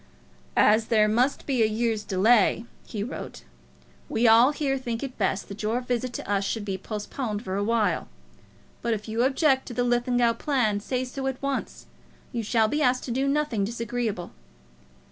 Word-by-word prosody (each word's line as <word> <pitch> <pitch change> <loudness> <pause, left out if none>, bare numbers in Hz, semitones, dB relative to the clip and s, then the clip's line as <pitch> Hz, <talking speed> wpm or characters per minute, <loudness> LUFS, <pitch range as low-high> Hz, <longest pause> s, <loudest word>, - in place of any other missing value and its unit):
"As 215 +1 +4
there 215 -2 +4
must 245 +6 +1
be 260 -4 0
a 220 - +5
year's 220 0 -1
delay," 220 +3 +3 0.2
he 210 -3 -4
wrote, 245 - -7 0.7
"we 230 +1 +2
all 230 +5 +7
here 290 -2 -1
think 235 -2 -4
it 265 -2 -5
best 195 -1 0
that 200 +1 -8
your 220 +3 0
visit 250 0 -2
to - - -6
us 200 -1 +1
should 205 +1 -2
be 195 -2 -2
postponed 210 +2 -4
for 190 -5 -4
a 200 - 0
while. 225 -1 +1 0.7
But 235 -1 0
if 210 +1 -8
you 220 +2 -1
object 270 0 +2
to 240 - -7
the 245 - +1
Linlithgow 245 -1 +2
plan, 245 -9 +1
say 255 +4 -2
so 265 +1 -4
at 265 -1 -3
once. 275 -1 -3 0.5
You 235 - -2
shall 220 0 +2
be 295 +7 -1
asked 255 -2 +2
to 245 - -5
do 265 +3 0
nothing 275 -7 0
disagreeable." 230 -3 -3
235 Hz, 185 wpm, -26 LUFS, 215-255 Hz, 0.7 s, all